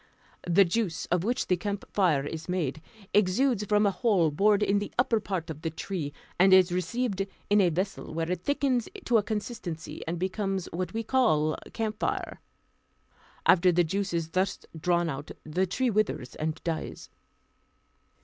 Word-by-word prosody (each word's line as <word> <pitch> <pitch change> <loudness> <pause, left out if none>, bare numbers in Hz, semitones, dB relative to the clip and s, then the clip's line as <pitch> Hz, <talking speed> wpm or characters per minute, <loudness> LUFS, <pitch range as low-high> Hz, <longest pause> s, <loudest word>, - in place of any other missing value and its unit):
The 190 +3 +6
juice, 180 -2 -1
of 175 -1 +2
which 245 +5 0
the 180 - +2
camphire 185 -5 0
is 160 +3 -6
made, 160 -5 -1 0.3
exudes 210 +4 +3
from 210 +1 +3
a 200 - +3
hole 185 -5 +2
bored 205 +6 +3
in 200 0 +2
the 205 - -5
upper 240 -2 +3
part 185 -6 -3
of 155 -1 -9
the 165 - -1
tree, 160 -2 -4 0.3
and 190 +1 +6
is 185 -1 +5
received 195 +3 -1 0.2
in 205 0 +6
a 180 - +4
vessel, 185 +4 -3
where 165 +2 -2
it 180 -1 -2
thickens 270 -5 +1 0.2
to 235 -2 +4
a - - +1
consistency, 205 -6 -5
and 170 +1 -2
becomes 190 +1 -2
what 180 +3 -3
we 225 - -1
call 210 - +2 0.2
camphire. 215 -2 -2 1.0
After 180 0 +6
the 175 0 +3
juice 195 +4 -2
is 165 -2 -1
thus 185 +2 0 0.2
drawn 175 +1 +1
out, 145 -1 -5
the 180 +5 0
tree 245 +7 0
withers 210 - -1
and 155 0 -2
dies. 165 -2 -4
185 Hz, 165 wpm, -28 LUFS, 165-210 Hz, 1.0 s, The